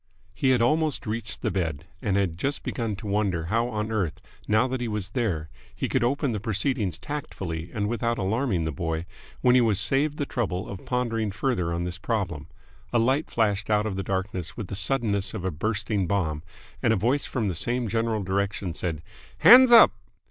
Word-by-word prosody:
He 135 - +1
had 125 -3 +4
almost 155 +3 +1
reached 115 +1 -4
the - - +1
bed, 80 -5 -2 0.2
and 100 -2 0
had 95 -5 0
just 140 +11 -2
begun 115 -4 -2
to 105 - -10
wonder 100 -5 0
how 115 +1 +2
on 110 -2 -3
earth, 95 -8 -1 0.3
now 110 +4 +3
that 130 -1 -3
he 120 - -1
was 105 -2 -3
there, 100 - -1 0.3
he - - -2
could - - +1
open 140 +2 +1
the 105 - -2
proceedings 105 - -1
tactfully 90 - -5
and 105 -1 -1
without 120 +1 -1
alarming 100 -2 0
the 80 - -1
boy, 80 +3 -3 0.4
when 125 - +5
he 125 - +6
was 110 -5 +2
saved 145 +2 +1
the 145 - -1
trouble 95 -9 -2
of 95 - -8
pondering 115 -4 0
further 100 -4 -1
on 85 +1 -2
this 90 0 -5
problem. 90 -10 -2 0.4
A 120 - +2
light 130 +6 +2
flashed 105 -2 0
out 105 0 +2
of 105 -3 -2
the 95 - -2
darkness 95 -2 -3
with 105 -6 -5
the - - -4
suddenness 105 -2 0
of 95 -4 -5
a 95 - 0
bursting 105 +3 -1
bomb, 80 -6 -1 0.4
and 120 - +3
a - - +3
voice 120 +8 +1
from 115 -6 -1
the 95 - -1
same 120 +8 -1
general 115 -1 0
direction 95 -1 -1
said 80 -2 -3 0.3
"Hands 250 +2 +9
up!" 235 - +9
105 Hz, 200 wpm, -26 LUFS, 95-120 Hz, 0.4 s, Hands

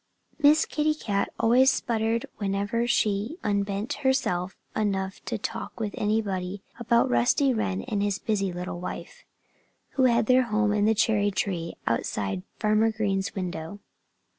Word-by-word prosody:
Miss 305 +1 +5
Kitty 305 0 0
Cat 200 -9 -1
always 250 +4 +5
spluttered 230 -2 0
whenever 205 +4 -1
she 215 - 0
unbent 200 +1 -1
herself 190 -9 0 0.2
enough 195 -2 -1
to - - -2
talk - - -5
with 210 -2 -2
anybody 200 -3 -1 0.2
about 235 0 +3
Rusty 120 - +3
Wren 95 - -1
and 205 - -2
his 205 -1 0
busy 200 -4 -1
little 175 0 -5
wife, 180 - -7 0.7
who 265 - +2
had 235 -2 +3
their 255 +2 +4
home 215 -2 +1
in 210 -1 +2
the 220 +1 +3
cherry 205 -1 +2
tree 180 -4 -2
outside 100 -4 -1 0.2
Farmer 215 +1 +2
Green's 200 -3 -1
window. 180 0 -5
210 Hz, 140 wpm, -26 LUFS, 190-230 Hz, 0.7 s, Miss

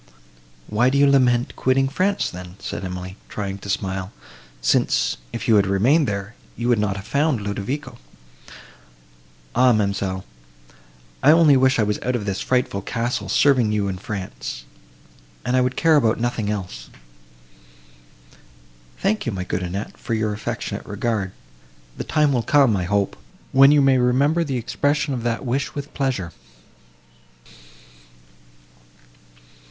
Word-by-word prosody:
"Why 120 - +2
do 135 - +1
you 140 - +5
lament 125 -3 +3
quitting 135 +1 +2
France, 185 +8 0
then?" 90 0 -9
said - - -6
Emily, 90 +1 -6
trying 100 -1 -4
to 100 - -9
smile, 95 -1 -2 0.5
"since, - - +1
if - - -5
you 110 - +5
had 100 -1 +3
remained 125 +11 +3
there, 100 +1 -4 0.2
you 120 +1 -1
would 120 -3 +3
not 105 -2 0
have 100 0 -7
found 145 -3 +1
Ludovico." 120 +6 -4 1.5
"Ah, 125 +1 +5
ma'amselle! 100 -3 -1 1.0
I 140 - +5
only 155 -2 +6
wish 130 +1 +3
I 110 - +3
was 105 0 -1
out 125 0 -1
of 110 -4 -3
this 100 -1 -2
frightful 125 -6 0
castle, 115 -1 -3
serving 130 -6 +3
you 105 -2 0
in 95 -1 -4
France, 100 -1 -6 0.8
and 125 +2 +1
I 130 - +4
would 125 +1 0
care 160 -2 +4
about 115 -5 +2
nothing 115 -3 -1
else!" 90 -13 -5 2.1
"Thank 210 - -1
you, - - 0
my 95 -3 -4
good 95 0 -3
Annette, 90 +4 -5
for 115 - -3
your 110 -1 -1
affectionate 105 0 -5
regard; 105 -2 -2 0.6
the - - -4
time 150 -3 +2
will 125 - +1
come, 135 -3 +4
I 90 -2 -1
hope, 100 +1 0 0.4
when 135 +1 +7
you 145 -1 +5
may 135 -1 +4
remember 140 +7 +2
the 135 -5 -2
expression 145 +5 0
of 125 - -3
that 120 +2 -2
wish 135 +3 -2
with 145 0 -6
pleasure." 130 -11 -2
115 Hz, 145 wpm, -22 LUFS, 100-135 Hz, 2.1 s, when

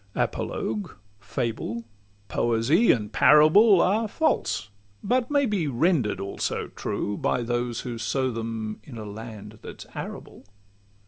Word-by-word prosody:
Apologue, 105 -2 -2 0.2
fable, 115 +3 -3 0.4
poesy, 120 - +3
and 105 -2 -1
parable, 175 +7 +6
Are 215 +4 +2
false, 210 - 0 0.3
but 250 0 +1
may 285 -2 +2
he 195 -8 0
render'd 135 - +1
also 100 0 -3
true, 105 - -3
By 120 - 0
those 120 0 -2
who 120 -3 -5
sow 130 +2 0
them 110 -1 -4
in 125 -5 -10
a 110 - -6
land 105 0 -9
that - - -10
's - - -8
arable. - - -8
120 Hz, 130 wpm, -26 LUFS, 110-170 Hz, 0.4 s, parable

